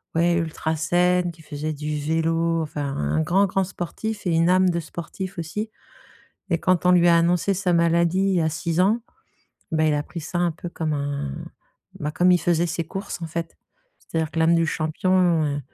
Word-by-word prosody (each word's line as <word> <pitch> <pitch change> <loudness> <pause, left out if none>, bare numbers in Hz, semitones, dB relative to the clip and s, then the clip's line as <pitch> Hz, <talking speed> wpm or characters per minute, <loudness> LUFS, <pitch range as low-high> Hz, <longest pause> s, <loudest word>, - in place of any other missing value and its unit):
ouais, 170 +1 +3
ultra 160 -1 -1
saine, 175 +2 +2
qui 165 -1 -17
faisait 150 +1 -4
du 150 0 -3
vélo, 165 +2 0
enfin, 150 -1 -4
un 75 +2 0
grand, 195 - +3
grand 195 0 0
sportif 195 +4 -5
et - - +2
une 165 +2 +3
âme 185 0 +4
de 170 -1 -1
sportif 175 +4 -7
aussi. 210 +7 -4 0.8
Et 170 - +2
quand 180 +1 +1
on - - +6
lui 175 -1 +5
a 170 - +6
annoncé 175 +3 +2
sa 185 -1 0
maladie, 170 +1 +3
il 190 - +1
y 170 - +3
a 160 - +1
6 165 +2 -2
ans, 220 +5 +2 0.7
bah, 155 -1 +2
il 155 -1 +3
a 145 0 -1
pris 170 - -7
ça 175 +3 -4
un 175 -2 +1
peu 175 +2 -7
comme 160 -2 -3
un 140 - -2 0.7
bah, 150 +1 -2
comme 180 +2 +4
il 180 - +4
faisait 175 0 +2
ses 165 0 -2
courses, 190 +1 -6
en 165 - -2
fait. 165 +1 -5 0.4
C'est-à-dire 160 -1 -3
que 165 - -4
l'âme 165 +1 +4
du 165 -1 +2
champion, 170 +1 +1
heu, 145 0 -1
170 Hz, 205 wpm, -23 LUFS, 155-180 Hz, 0.8 s, on